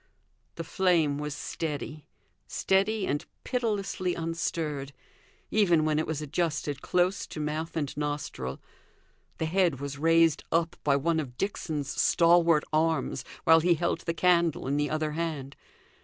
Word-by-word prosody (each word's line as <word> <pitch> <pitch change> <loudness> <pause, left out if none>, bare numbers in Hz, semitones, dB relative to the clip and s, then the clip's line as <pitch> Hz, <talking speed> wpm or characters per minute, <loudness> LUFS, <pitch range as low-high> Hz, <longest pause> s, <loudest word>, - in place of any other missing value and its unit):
The 165 - -4
flame 165 -4 +2
was 150 -1 -4
steady 150 -2 -5 0.4
steady 195 +2 +1
and 145 +4 -1 0.2
pitilessly 205 -7 -1
unstirred, 160 -4 -3 0.6
even 175 -7 +3
when 155 -1 +2
it 155 - -1
was 155 -1 -3
adjusted 150 -2 -2
close 180 +2 +1
to - - -7
mouth 155 +2 -3
and 145 -4 -2
nostril; 145 - -4 0.8
the 160 - -1
head 170 -4 +2
was 140 0 -5
raised 165 0 +4
up 165 +1 +1
by 140 -2 +3
one 160 +3 +1
of 125 -5 -6
Dixon's 155 -7 -2
stalwart 170 -2 +4
arms, 160 +1 +1 0.2
while 160 0 +7
he 170 +1 +3
held 170 +2 -1
the 165 - -3
candle 170 -3 +2
in 135 +2 0
the 145 -1 0
other 155 0 -1
hand. 150 -4 -4
160 Hz, 140 wpm, -28 LUFS, 150-170 Hz, 0.8 s, while